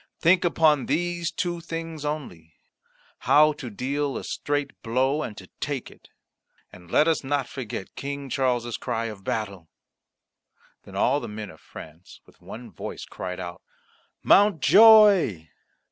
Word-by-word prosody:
Think 175 +3 +4
upon 155 -5 +2
these 175 0 -1
two 175 -1 -3
things 165 -2 -6
only 90 - -6 0.6
how 155 +1 +4
to 135 -4 -8
deal 140 +5 -3
a - - -6
straight 145 -1 -2
blow 130 +6 0
and 105 -8 -6
to 95 - -10
take 140 -4 -4
it. - - -20 0.6
And 90 -1 -15
let 150 - +3
us 165 -3 +1
not 135 -1 -1
forget 115 -7 -7
King 140 0 -5
Charles's 120 -3 -1
cry 115 -2 -3
of 105 -4 -7
battle." 100 -6 -4 1.2
Then - - -12
all 140 +3 +2
the 120 - -7
men 105 -2 -7
of 80 - -18
France 80 +3 -13
with - - -23
one 115 0 -10
voice 85 - -7
cried 90 0 -7
out, 90 -1 -7 0.6
"Mountjoy!" 200 - +6
135 Hz, 145 wpm, -25 LUFS, 105-155 Hz, 1.2 s, Mountjoy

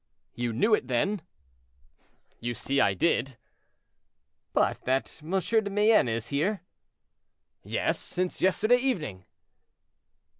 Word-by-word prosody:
"You 120 -1 -2
knew 175 - +2
it, 170 - +2
then?" 175 - 0 1.2
"You 120 0 -3
see 140 +3 0
I 100 - +3
did." 130 - 0 1.1
"But - - +1
that 130 +5 -1
M. 155 - -11
de 220 +2 +1
Mayenne 210 - +4
was 115 0 -3
here?" 175 +7 0 1.0
"Yes, - - -1
since 180 0 -3
yesterday 215 +6 +4
evening." 160 - -2
160 Hz, 110 wpm, -28 LUFS, -, 1.2 s, Mayenne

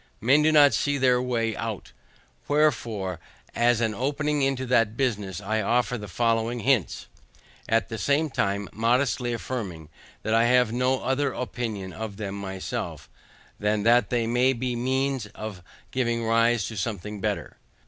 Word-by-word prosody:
Men 135 +7 +4
do 155 +1 +4
not 145 -4 +6
see 145 +4 +1
their 125 -2 +3
way 115 -3 -1
out 115 -3 -5 0.6
Wherefore, 115 - 0 0.3
as 120 -1 +2
an 110 -2 +1
opening 145 +5 -1
into 135 -1 0
that 115 -3 +2
business, 105 -9 -1
I 110 +2 -1
offer 120 +2 +1
the 105 -3 -6
following 115 +4 0
hints; 125 -5 +1 0.6
at 115 -3 +2
the 115 - -5
same 145 +2 +1
time 100 -2 -1
modestly 120 +2 +1
affirming, 100 -10 -5 0.3
that 110 - 0
I 115 +1 +4
have 125 -2 +3
no 130 +2 +1
other 140 +2 0
opinion 110 -7 -4
of 110 -3 -6
them 100 -3 -4
myself, 95 -2 -5 0.5
than 105 0 0
that 115 -1 +4
they 120 -2 +1
may 125 +3 +3
be 125 0 -2
the - - -3
means 130 -2 0
of 105 -4 -7 0.3
giving 120 -2 0
rise 115 -1 +3
to 110 - -8
something 105 0 -4
better. - - -3
115 Hz, 160 wpm, -26 LUFS, 105-130 Hz, 0.6 s, not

